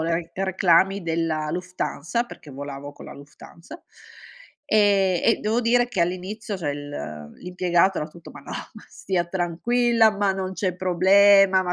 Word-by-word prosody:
re 165 Hz, +1 st, -2 dB
reclami 190 Hz, 0 st, +2 dB
della 160 Hz, -2 st, -2 dB
Lufthansa, 180 Hz, +3 st, -3 dB
perché 155 Hz, -10 st, -13 dB
volavo 140 Hz, +1 st, -8 dB
con -, -, -13 dB
la -, -, -10 dB
Lufthansa, 155 Hz, -, -14 dB, 0.9 s
e 200 Hz, -4 st, +3 dB
e 230 Hz, -, +3 dB
devo 225 Hz, +3 st, 0 dB
dire 245 Hz, +1 st, +2 dB
che 195 Hz, -8 st, 0 dB
all'inizio 190 Hz, +4 st, -4 dB
cioè 150 Hz, -5 st, -2 dB
il 145 Hz, 0 st, -8 dB, 0.5 s
l'impiegato 180 Hz, +1 st, +1 dB
era 150 Hz, -, -3 dB
tutto: 170 Hz, +1 st, -14 dB
"Ma -, -, -12 dB
no, -, -, -10 dB, 0.2 s
ma -, -, -13 dB
stia 180 Hz, -3 st, -2 dB
tranquilla, 220 Hz, +7 st, +2 dB
ma 200 Hz, -1 st, +1 dB
non 190 Hz, 0 st, -4 dB
c'è 185 Hz, -2 st, -2 dB
problema, 190 Hz, +1 st, +5 dB
ma 180 Hz, -, -2 dB
185 Hz, 155 wpm, -23 LUFS, 170-200 Hz, 0.9 s, problema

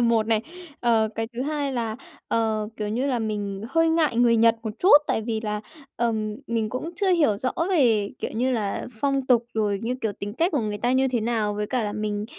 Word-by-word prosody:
một 230 Hz, -2 st, +3 dB
này. 220 Hz, -1 st, +2 dB, 0.4 s
Ờ, 225 Hz, -2 st, +3 dB
cái 225 Hz, -, -2 dB
thứ 245 Hz, +2 st, -3 dB
hai 290 Hz, -1 st, -2 dB
là, 230 Hz, -3 st, -2 dB, 0.3 s
ờ, 220 Hz, -2 st, 0 dB
kiểu 210 Hz, -1 st, -3 dB
như 245 Hz, +6 st, -1 dB
là, 255 Hz, -3 st, 0 dB
mình 205 Hz, -3 st, -3 dB
hơi 330 Hz, +5 st, +3 dB
ngại 320 Hz, -6 st, +2 dB
người 235 Hz, -1 st, +4 dB
Nhật 230 Hz, 0 st, +5 dB
một 220 Hz, -, -3 dB
chút, 375 Hz, -, +4 dB
tại 220 Hz, -, 0 dB
vì 220 Hz, -1 st, -2 dB
là, 210 Hz, -1 st, -3 dB, 0.4 s
ừm, 220 Hz, -3 st, -1 dB
mình 225 Hz, -2 st, -1 dB
cũng 255 Hz, +9 st, -4 dB
chưa 385 Hz, +1 st, +1 dB
hiểu 295 Hz, -, +3 dB
rõ 255 Hz, +3 st, -1 dB, 0.2 s
về, 225 Hz, -, +3 dB
kiểu -, -, -4 dB
như 250 Hz, +4 st, +1 dB
là, 210 Hz, -5 st, -2 dB
phong 275 Hz, -2 st, 0 dB
tục 240 Hz, -2 st, +4 dB
rồi 210 Hz, -2 st, 0 dB
như 240 Hz, +2 st, -1 dB
kiểu 220 Hz, -4 st, -1 dB
tính 205 Hz, +1 st, -5 dB
cách 335 Hz, +8 st, +1 dB
của 290 Hz, -, +1 dB
người 210 Hz, -2 st, -3 dB
ta 245 Hz, +1 st, +1 dB
như 265 Hz, +1 st, +3 dB
thế 245 Hz, -3 st, 0 dB
nào. 220 Hz, -2 st, 0 dB
Với 210 Hz, 0 st, -2 dB
cả 245 Hz, 0 st, -1 dB
là 205 Hz, -, -2 dB
mình 210 Hz, -1 st, -2 dB
230 Hz, 235 wpm, -24 LUFS, 215-255 Hz, 0.4 s, Nhật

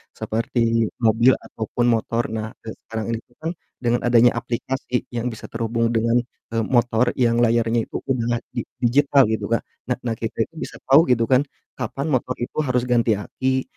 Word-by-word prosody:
seperti 115 Hz, 0 st, 0 dB, 0.2 s
mobil 115 Hz, +3 st, +5 dB
ataupun 115 Hz, +2 st, -4 dB
motor. 115 Hz, +1 st, 0 dB
Nah, 110 Hz, -1 st, -3 dB, 0.2 s
e 110 Hz, -, -6 dB, 0.2 s
sekarang 110 Hz, -2 st, -4 dB
ini 115 Hz, -, -1 dB
itu 120 Hz, -, -25 dB
kan, 165 Hz, -, -1 dB, 0.3 s
dengan 120 Hz, -1 st, +1 dB
adanya 120 Hz, 0 st, +6 dB
aplikasi 125 Hz, +1 st, -3 dB
yang 120 Hz, 0 st, -2 dB
bisa 110 Hz, -, -9 dB
terhubung 115 Hz, 0 st, -1 dB
dengan, 115 Hz, +2 st, +3 dB, 0.3 s
eee, 115 Hz, -, 0 dB
motor 120 Hz, -1 st, +2 dB
yang 120 Hz, -2 st, +2 dB
layarnya 115 Hz, 0 st, +3 dB
itu -, -, -13 dB, 0.2 s
udah 120 Hz, -2 st, 0 dB
di -, -, -3 dB, 0.2 s
digital 140 Hz, +3 st, +5 dB
gitu 110 Hz, -, -1 dB
Kak. 115 Hz, -, +1 dB, 0.3 s
Nah 125 Hz, -, 0 dB
nah, 115 Hz, -2 st, -1 dB
kita 115 Hz, 0 st, -1 dB
itu 165 Hz, -, -29 dB
bisa -, -, -6 dB
tahu 140 Hz, +5 st, +6 dB
gitu 120 Hz, -2 st, +3 dB
kan, 130 Hz, 0 st, +6 dB, 0.4 s
kapan 130 Hz, +3 st, -3 dB
motor 125 Hz, -1 st, 0 dB
itu 120 Hz, -, -7 dB
harus 125 Hz, -5 st, +1 dB
ganti 120 Hz, -3 st, +2 dB
aki, 130 Hz, +6 st, -1 dB
120 Hz, 180 wpm, -22 LUFS, 115-125 Hz, 0.4 s, adanya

